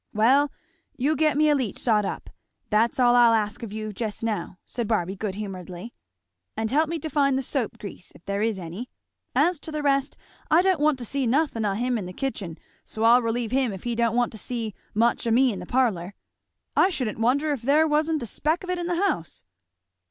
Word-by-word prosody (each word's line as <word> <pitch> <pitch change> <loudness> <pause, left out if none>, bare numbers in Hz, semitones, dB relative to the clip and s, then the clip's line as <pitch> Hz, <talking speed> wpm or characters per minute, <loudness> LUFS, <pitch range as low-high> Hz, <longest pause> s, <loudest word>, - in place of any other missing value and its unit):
"Well 270 +7 +4 0.5
you 285 +5 +1
get 305 -2 +2
me 305 0 +4
a - - +5
leach 255 -8 -1
sot 215 -4 +2
up - - -5 0.4
that's 225 +4 +2
all 245 -1 +5
I'll 235 -2 +6
ask 210 -2 -1
of 230 -4 -6
you 215 0 -5
just 215 +1 -4
now," 215 -4 -3
said 235 -3 -3
Barby 190 -4 0
good 200 -1 -4
humouredly; 190 0 -7 0.6
"and 220 0 -1
help 310 +3 +2
me 335 - -2
to 315 - -5
find 275 -2 +2
the 265 - -1
soap 255 -3 -2
grease, 195 -2 -9
if - - -18
there 200 +1 -2
is 220 -2 0
any. 185 +7 -7 0.5
As 350 -2 +3
to 315 - -9
the 305 -1 -3
rest, 275 -1 +1 0.3
I 325 +3 +5
don't 375 -4 +2
want 300 -1 +3
to 245 - -5
see 270 +2 -1
nothin' 255 -3 +1
o' 200 - +1
him 240 +3 0
in 185 - -5
the 180 - -8
kitchen 190 -9 -4 0.3
so 220 - -5
I'll 235 +2 +6
relieve 230 -1 -2
him 260 -3 +1
if 190 -2 -8
he 240 - -1
don't 235 -1 +1
want 245 0 +2
to 220 - -8
see 230 -3 -4 0.2
much 235 +2 +2
o' - - +2
me 250 +1 +4
in 190 - -6
the 180 - -8
parlour. 205 -8 0 0.6
I - - +5
shouldn't 250 - -3
wonder 275 +7 +2
if 280 -5 -2
there 295 +6 +4
wa'n't 305 -1 +1
a - - -3
speck 310 - -1
of 365 - -3
it 360 - -2
in 345 - -3
the 350 - 0
house." 165 - -4
240 Hz, 225 wpm, -25 LUFS, 215-280 Hz, 0.6 s, I'll